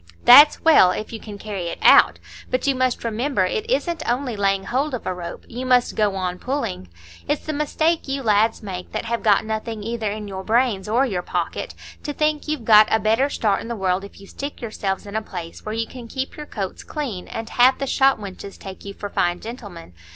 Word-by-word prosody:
"That's 290 +5 +9
well, 315 - +6
if 215 +5 -4
you 225 - -5
can 210 -2 -9
carry 200 -4 -5
it - - -4
out. - - +7 0.3
But 255 - -1
you 280 - +3
must 255 -1 0
remember 230 -2 0
it 435 - -3
isn't 345 -9 0
only 245 -1 -1
laying 195 -1 +1
hold 265 +6 -1
of 245 - -8
a 185 - -1
rope, 175 -1 -8
you 245 +2 -6
must 250 -1 +2
go 210 -2 +1
on 180 -1 -3
pulling. 240 - -3 0.4
It's 295 0 -1
the 310 - -3
mistake 310 +2 0
you 275 0 -3
lads 220 0 +2
make 185 -3 -7
that - - -3
have 235 0 -2
got 210 0 +3
nothing 220 0 -4
either 225 -1 -2
in 210 0 -6
your 190 -1 -6
brains 220 -3 +1
or 245 +5 +3
your 190 -8 -2
pocket, - - -3 0.3
to 295 - -4
think 305 0 0
you've 300 -7 -3
got 215 -1 +7
a 220 - +3
better 225 +7 +2
start 210 -7 0
in - - -8
the 235 - -3
world 190 -2 0
if 200 - -12
you 200 - -13
stick 280 +8 -7
yourselves 205 -4 -3
in 200 +1 -8
a 220 - 0
place 175 -5 -8
where 215 +1 -4
you 225 0 -1
can 245 0 -10
keep 265 +3 -4
your 300 -1 -8
coats 195 -4 -5
clean, 250 - -5
and 225 0 -6
have 255 +2 +5
the 275 - -2
shopwenches 210 -8 0
take 190 -1 -10
you 200 0 -8
for 205 - -5
fine 175 -3 0
gentlemen. 205 - -9
220 Hz, 225 wpm, -22 LUFS, 200-260 Hz, 0.4 s, That's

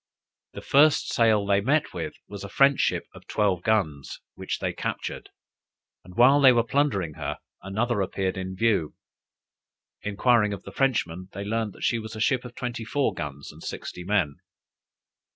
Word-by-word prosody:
The - - -8
first 145 +2 +4
sail 110 -3 +3
they 100 0 +3
met 145 +7 +1
with - - -4
was 100 -1 -8
a 100 - -7
French 135 +7 +4
ship - - +1
of - - -15
twelve 100 -5 +1
guns, 85 -10 -1
which - - -4
they - - -2
captured; - - -5 0.7
and 90 - -14
while 130 +5 +6
they 135 -2 +8
were 120 -2 +3
plundering 115 - 0
her, 75 -2 -4 0.2
another 105 +3 -1
appeared 95 0 -1
in 95 0 -5
view. 100 -7 +1 1.1
Enquiring 105 +1 +2
of 100 - -7
the - - -9
Frenchmen, 95 -10 -1
they 100 - -5
learned 110 0 -2
that - - -11
she 120 - +1
was 110 0 -8
a - - -6
ship 125 +3 +1
of 125 -1 -10
twenty 120 -2 -4
four 125 0 0
guns 70 -4 -6
and - - -15
sixty 90 - -6
men. 90 -7 0
105 Hz, 170 wpm, -26 LUFS, 95-120 Hz, 1.1 s, they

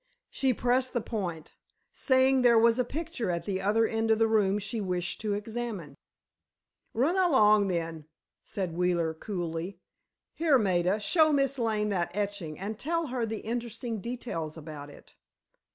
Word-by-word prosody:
She 265 -1 +1
pressed 250 +2 +1
the 240 - 0
point, 180 -9 -5 0.4
saying 260 -1 +3
there 240 -2 +6
was 230 +2 +4
a - - +4
picture 300 - -4
at 170 -1 -2
the 190 -1 -2
other 215 +4 +3
end 225 0 -1
of 220 - +4
the 225 - +4
room 205 -3 +2
she 210 +2 -3
wished 180 -2 -2
to 210 -2 -1
examine. 210 -8 -5 1.0
"Run 275 +10 +2
along, 215 - +5
then," 165 -4 -3 0.4
said 185 -4 -4
Wheeler, 175 -2 +1
coolly. 175 0 -4 0.6
"Here, 315 -4 +3
Maida, 185 -2 +1
show 315 - +4
Miss 275 -2 +1
Lane 215 -2 0
that 180 -4 0
etching 200 -7 -3
and 210 +3 -5
tell 335 +2 -1
her 240 -3 -1
the 220 -1 -4
interesting 230 -1 -4
details 175 -10 -5
about 150 -2 -8
it." 145 - -16
215 Hz, 155 wpm, -29 LUFS, 180-245 Hz, 1.0 s, there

